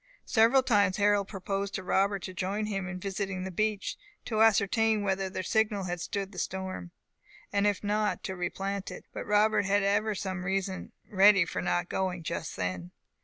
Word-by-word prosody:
Several 235 +3 +4
times 205 -6 +3
Harold 205 -1 +3
proposed 195 0 -3
to 190 - -4
Robert 195 +1 +1
to 185 - -6
join 195 +3 -2
him 195 -3 -3
in 185 0 -5
visiting 195 -1 -3
the 190 - -5
beach, 215 +1 -1 0.3
to 220 -2 0
ascertain 220 0 +3
whether 195 -1 0
their 185 - -4
signal 210 0 +1
had 175 -2 -3
stood 195 +2 -3
the 180 - -7
storm, 190 - -4 0.6
and 200 0 +3
if 205 -1 0
not, 210 +1 0
to 190 - -4
replant 195 +2 -3
it; - - -9
but - - -5
Robert 210 -1 +3
ever 205 +2 +2
had 210 - -2
some 185 -1 -4
reason 190 0 -2 0.2
ready 195 -2 +6
for - - -3
not 175 0 0
going 185 -2 -2
just 165 -1 -4
then. 90 -2 -3
195 Hz, 180 wpm, -29 LUFS, 185-205 Hz, 0.6 s, ready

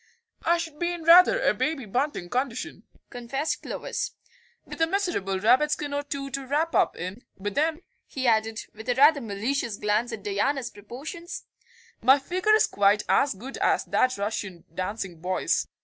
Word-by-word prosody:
"I 340 +1 +3
should 325 -3 -6
be 345 0 0
in 345 -2 -6
rather 360 +8 +7
a - - +3
Baby 300 -5 -2
Bunting 250 -2 -2
condition," 255 - -3 0.3
confessed 270 +5 -3
Clovis, - - -4 0.5
"with - - -8
a 325 - +4
miserable 340 - -1
rabbit 250 +9 +4
skin 295 -1 -2
or 285 - 0
two 280 -1 -5
to 270 0 -4
wrap 310 +4 0
up - - +2
in, 185 +7 -6
but 205 +1 -4
then," 315 - 0 0.2
he 265 -1 -4
added, 220 -1 +2
with 220 +3 -9
a 245 - +2
rather 285 +2 +6
malicious 225 +1 -2
glance 210 +3 0
at 220 -3 -6
Diana's 235 +6 -1
proportions, 285 - -8 0.6
"my 265 +4 +6
figure 370 +9 +2
is 435 - +4
quite 205 +1 +3
as 275 -7 +3
good 255 +8 -8
as - - +2
that 255 0 +1
Russian 200 -4 -4
dancing 185 -1 -4
boy's." 185 +1 0
260 Hz, 170 wpm, -26 LUFS, 210-305 Hz, 0.6 s, rather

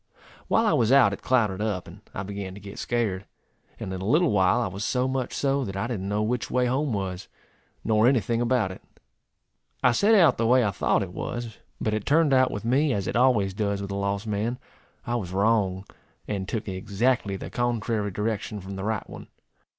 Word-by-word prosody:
While 225 - +3
I 215 - +3
was 115 -1 +2
out 130 -7 +6
it - - -7
clouded 110 -6 +1
up, 105 -5 -2
and 90 +5 -12
I 100 - -5
began 100 -1 -6
to - - -9
get 100 0 -9
scared; 105 -5 -1 0.5
and 95 - -5
in 95 - -5
a - - -4
little 160 - +3
while 95 +3 +3
I 120 - 0
was 95 +1 -5
so 125 +2 0
much 130 -1 -2
so, 140 0 0
that 95 -5 -5
I 100 - -1
didn't 100 -6 -3
know 105 +1 0
which 115 0 -1
way 125 0 +1
home 135 +3 0
was, 95 -3 -3 0.6
nor 110 +1 +3
any 130 -1 +4
thing 115 +1 -1
about 120 -5 +1
it. 95 - -10 1.0
I 125 - +6
set 205 - +4
out 165 -10 +5
the 115 - +2
way 125 0 +5
I 100 - +1
thought - - +1
it - - -8
was, 120 -2 -5 0.2
but 110 - -1
it 110 -1 -3
turned 150 -1 +4
out 130 -1 +4
with 105 - -5
me, 135 +4 +2
as 100 -3 -2
it - - -3
always 115 -6 +3
does 100 0 -1
with 100 0 -5
a - - -3
lost 100 +1 -2
man, 110 +3 -2 0.5
I 120 - -2
was 90 -6 -5
wrong, 100 -2 +1 0.4
and 100 -2 -3
took 110 -2 -3
exactly 100 +3 0
the - - -7
contrary 115 -3 -1
direction 105 +1 -3
from 95 0 -7
the 95 - -5
right 110 0 -2
one. - - -10
110 Hz, 220 wpm, -26 LUFS, 100-125 Hz, 1.0 s, out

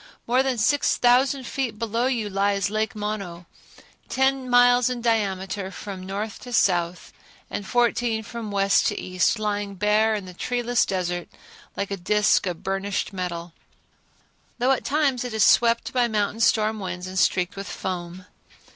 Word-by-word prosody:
More 250 +2 +3
than 265 -2 -1
six 275 +6 +2
thousand 255 +2 +3
feet 240 -4 -3
below 230 +2 -1
you 235 -5 -1
lies 200 0 0
Lake 215 +2 -1
Mono, 200 -5 -5 0.6
ten 265 -1 +1
miles 245 0 +5
in 250 -1 -3
diameter 200 -4 -1
from 195 -1 -8
north 200 +3 -5
to 245 - -10
south, 175 -6 +1 0.4
and 200 - -4
fourteen 240 -2 +1
from 230 0 -7
west 200 -1 +2
to - - -2
east, 185 +4 +1
lying 205 -1 -2
bare 210 +3 +2
in 205 -3 -5
the 180 - -10
treeless 245 +4 0
desert 175 -2 -2 0.5
like 200 0 -3
a 200 - -2
disk 210 +2 +2
of 175 -2 -5
burnished 195 +1 -2
metal, 175 -2 -5 1.0
though 255 +2 +2
at 265 - +1
times 280 -4 +1
it 245 -3 -5
is 215 - +4
swept 235 0 +3
by 245 -2 +3
mountain 210 -1 -1
storm 220 -1 +2
winds 180 -2 -5
and 185 0 -3
streaked 180 -1 +1
with 200 0 -6
foam. 180 0 -5
210 Hz, 160 wpm, -24 LUFS, 190-240 Hz, 1.0 s, miles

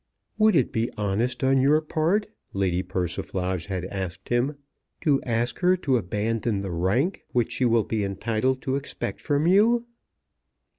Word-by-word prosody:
"Would 215 -2 +5
it 135 -6 +2
be 115 +1 0
honest 105 +6 -1
on 135 0 +4
your 145 +3 +4
part," 160 +7 0 0.3
Lady 95 -2 0
Persiflage 90 0 -3
had 95 -2 -3
asked 95 0 -6
him, 125 +5 +1 0.5
"to 145 -5 +2
ask 120 0 -1
her 185 0 +4
to 140 -7 +1
abandon 105 +1 -1
the 95 - -4
rank 100 - 0
which 120 -3 +1
she 130 - 0
will 115 -2 +3
be 110 -1 -2
entitled 115 +6 -1
to 135 -1 0
expect 140 - -5
from 145 0 +1
you?" 225 +6 +4
120 Hz, 155 wpm, -25 LUFS, 100-145 Hz, 0.5 s, Would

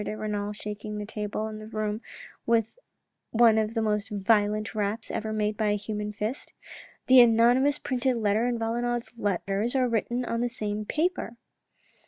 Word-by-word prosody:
de 215 - -4
Renal, 210 -1 -2
shaking 210 0 -6
the 210 - -4
table 210 0 -4
and 215 0 -6
the 215 - -9
room 215 0 -3 0.5
with 230 - +1 0.5
one 225 -1 +5
of 220 +1 -2
the 225 - +1
most 210 0 0
violent 210 +1 +1
raps 215 +1 -2
ever 220 0 -3
made 210 0 0
by 215 0 0
a 205 - +2
human 210 0 -4
fist. 210 +5 -5 0.5
"The 260 0 +7
anonymous 240 +5 +4
printed 255 -1 -1
letter 215 +1 +1
and 240 -1 -1
Valenod's 240 +1 -2
letters 205 +2 -1
are 255 -1 +3
written 240 +2 -1
on 230 0 -1
the 245 - 0
same 210 -3 -3
paper." 310 - -1
220 Hz, 170 wpm, -27 LUFS, 210-235 Hz, 0.5 s, The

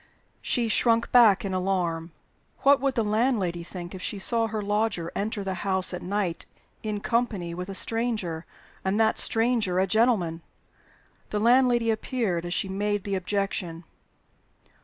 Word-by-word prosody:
She 240 -3 0
shrunk 230 +1 +2
back 230 -3 +5
in 190 - -3
alarm. 180 -3 -2 0.5
What 280 -1 +4
would 275 -1 0
the 230 - +1
landlady 210 -6 0
think 175 +1 -9
if 185 - -8
she 205 - -3
saw 230 +3 +2
her 220 0 -4
lodger 205 -4 -1
enter 210 0 -3
the 190 -1 -3
house 190 -2 +3
at 180 - -5
night 190 -3 -3 0.3
in 210 -2 -4
company 220 -8 -1
with 180 +2 -6
a 195 - -6
stranger, 215 -7 0 0.4
and 190 +3 0
that 220 0 +3
stranger 225 -5 +4
a 190 - +3
gentleman? 195 -6 +1 0.9
The 210 - -2
landlady 240 0 +3
appeared 215 -6 -2
as 175 - -3
she - - -1
made 205 +1 -2
the 200 - -4
objection. 185 -3 -3
205 Hz, 155 wpm, -26 LUFS, 180-230 Hz, 0.9 s, back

